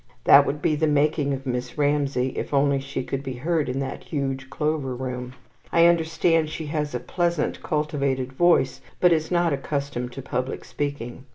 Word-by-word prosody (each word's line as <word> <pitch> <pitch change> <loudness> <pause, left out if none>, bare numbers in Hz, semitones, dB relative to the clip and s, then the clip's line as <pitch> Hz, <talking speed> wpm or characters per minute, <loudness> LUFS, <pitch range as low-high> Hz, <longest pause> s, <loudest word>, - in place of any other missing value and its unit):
That - - +7
would 150 +1 -3
be 155 - +3
the 155 +1 +1
making 150 0 +2
of 135 0 -4
Miss 125 0 -3
Ramsay, 140 -3 +1
if - - -3
only 140 0 +3
she 135 -1 -4
could 135 +1 -3
be 135 -2 -5
heard 155 +3 -1
in 125 - -2
that 135 - -5
huge 135 -2 -3
Clover 145 -2 -1
Room. 125 0 -5 0.4
I 170 0 +5
understand 165 -1 +3
she 160 0 -5
has 150 -4 -1
a - - -1
pleasant 170 +3 -1
cultivated 140 -5 -1
voice, 175 +5 +3 0.2
but 180 -1 +5
is 160 -1 0
not 175 -3 +2
accustomed 140 -3 -3
to 135 - -7
public 130 0 -3
speaking. 140 -3 -4
140 Hz, 180 wpm, -24 LUFS, 130-155 Hz, 0.4 s, That